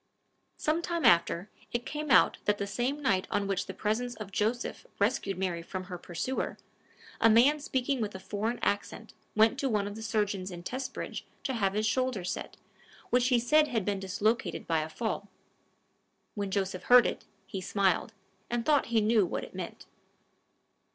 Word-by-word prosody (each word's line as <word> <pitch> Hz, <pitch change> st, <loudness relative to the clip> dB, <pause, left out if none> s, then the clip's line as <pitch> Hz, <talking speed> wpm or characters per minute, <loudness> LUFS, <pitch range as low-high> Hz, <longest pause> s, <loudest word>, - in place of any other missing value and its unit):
Some 315 Hz, +2 st, 0 dB
time 340 Hz, -1 st, -1 dB
after, 170 Hz, +3 st, +4 dB, 0.2 s
it 240 Hz, +1 st, -2 dB
came 300 Hz, 0 st, -4 dB
out -, -, +5 dB
that 210 Hz, 0 st, +2 dB
the 200 Hz, -, -2 dB
same 255 Hz, +8 st, -2 dB
night 190 Hz, -8 st, +2 dB
on 205 Hz, -1 st, 0 dB
which 195 Hz, -1 st, -1 dB
the -, -, -5 dB
presence 240 Hz, +3 st, -1 dB
of 215 Hz, -2 st, -8 dB
Joseph 220 Hz, +5 st, -1 dB
rescued 200 Hz, -3 st, 0 dB
Mary 180 Hz, -3 st, -1 dB
from 185 Hz, +2 st, -5 dB
her 180 Hz, -1 st, -7 dB
pursuer, 180 Hz, +11 st, -3 dB, 0.6 s
a 225 Hz, -, +6 dB
man 255 Hz, +7 st, +6 dB
speaking 265 Hz, -2 st, -1 dB
with 210 Hz, -2 st, -3 dB
a -, -, -5 dB
foreign 215 Hz, +5 st, -2 dB
accent 205 Hz, +2 st, -2 dB, 0.2 s
went 225 Hz, +4 st, +4 dB
to 275 Hz, -, 0 dB
one 210 Hz, -3 st, +1 dB
of 205 Hz, -, -4 dB
the 220 Hz, -, -7 dB
surgeons 205 Hz, -4 st, -1 dB
in 175 Hz, -2 st, -8 dB
Testbridge 255 Hz, +7 st, -4 dB, 0.2 s
to 265 Hz, -, -1 dB
have 195 Hz, -5 st, +1 dB
his 215 Hz, +1 st, 0 dB
shoulder 255 Hz, -3 st, 0 dB
set, 180 Hz, -, -4 dB, 0.5 s
which 250 Hz, 0 st, +4 dB
he 250 Hz, -2 st, +4 dB
said 300 Hz, +6 st, +4 dB
had 225 Hz, -8 st, -1 dB
been 200 Hz, -1 st, 0 dB
dislocated 205 Hz, +5 st, -1 dB
by 165 Hz, -1 st, +1 dB
a 155 Hz, -, -4 dB
fall. 205 Hz, +2 st, -3 dB, 1.0 s
When 200 Hz, -2 st, -3 dB
Joseph 190 Hz, -1 st, -2 dB
heard 245 Hz, 0 st, +8 dB
it, -, -, -3 dB, 0.2 s
he 195 Hz, -4 st, -5 dB
smiled, 195 Hz, +2 st, +1 dB, 0.4 s
and 235 Hz, -1 st, -1 dB
thought 295 Hz, -2 st, +3 dB
he 230 Hz, -1 st, +2 dB
knew 215 Hz, 0 st, +4 dB
what 175 Hz, -, -2 dB
it -, -, -10 dB
meant. -, -, -7 dB
215 Hz, 180 wpm, -30 LUFS, 195-245 Hz, 1.0 s, heard